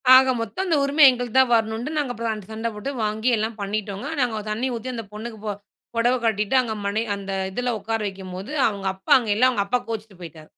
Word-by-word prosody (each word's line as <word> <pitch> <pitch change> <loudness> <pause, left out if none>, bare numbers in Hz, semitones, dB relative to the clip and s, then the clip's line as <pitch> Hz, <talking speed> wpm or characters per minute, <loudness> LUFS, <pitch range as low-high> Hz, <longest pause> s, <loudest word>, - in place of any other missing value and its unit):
ஆக 265 0 +7
மொத்தம் 230 - -3
அந்த 330 - +3
உரிம 290 +2 +4
எங்களுக்குத்தா 245 +1 +3
வரணும்னுட்டு 225 +6 0
நாங்க 270 -4 0 0.3
ச - - -15
சண்ட 225 +1 -3
போட்டு 210 +7 -4
வாங்கி 215 +3 0
எல்லா 220 +1 0
பண்ணிட்டோங்க. 200 +3 -3
நாங்க 225 -4 0
தண்ணி 240 +5 -1
ஊத்தி, 250 +3 -5
அந்த 225 -2 -5
பொண்ணுக்கு 220 0 -7
ப 205 -2 -2 0.4
புடவ 240 +2 +3
கட்டிட்டு, 215 +2 +1
அங்க 225 -3 -3
மனை 210 +3 0
அந்த 195 -1 -6 0.2
இதுல 245 +3 -1
உக்கார 225 +2 -2
வைக்கும்போது 190 +4 -7 0.2
அவுங்க 200 -2 -3
அப்பா 190 - -8
அங்க 225 -4 -2
இல்ல. 250 +4 +4
அவுங்க 200 -5 0
அப்பா 250 +2 +1
கோச்சுட்டு 215 -4 -6
போயிட்டாரு. 155 -2 -10
220 Hz, 200 wpm, -23 LUFS, 205-245 Hz, 0.4 s, ஆக